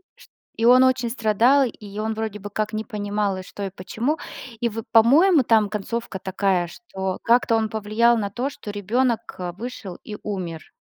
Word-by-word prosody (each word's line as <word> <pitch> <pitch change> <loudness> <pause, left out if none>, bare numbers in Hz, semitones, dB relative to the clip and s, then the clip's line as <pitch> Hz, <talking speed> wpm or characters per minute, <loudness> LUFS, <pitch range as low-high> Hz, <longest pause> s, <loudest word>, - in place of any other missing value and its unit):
Ш - - -17
ш - - -29 0.3
и 225 - +1
он 255 +2 +7
очень 255 -2 +2
страдал, 235 +4 +3
и 210 -3 -8
он 220 +1 -1
вроде 220 -1 -4
бы 205 +1 -7
как 215 +1 -2
не 215 0 -3
понимал, 205 -3 -2
и 185 - -6
что, 200 - -8
и - - -3
почему. 225 +10 -2 0.4
И 235 - +2
вот 225 0 -6
по-моему 280 - +6
там 220 -3 +3
концовка 220 +1 -4
такая, 190 -1 0
что 190 -1 -5
как-то 235 0 +3
он 220 -1 +1
повлиял 220 +3 +2
на 205 -2 -2
то, 245 +7 -2
что 250 -8 -8
ребенок 230 +3 -1 0.2
вышел 215 -5 -7
и 210 - -6
умер. 180 -6 -5
220 Hz, 190 wpm, -23 LUFS, 205-235 Hz, 0.4 s, он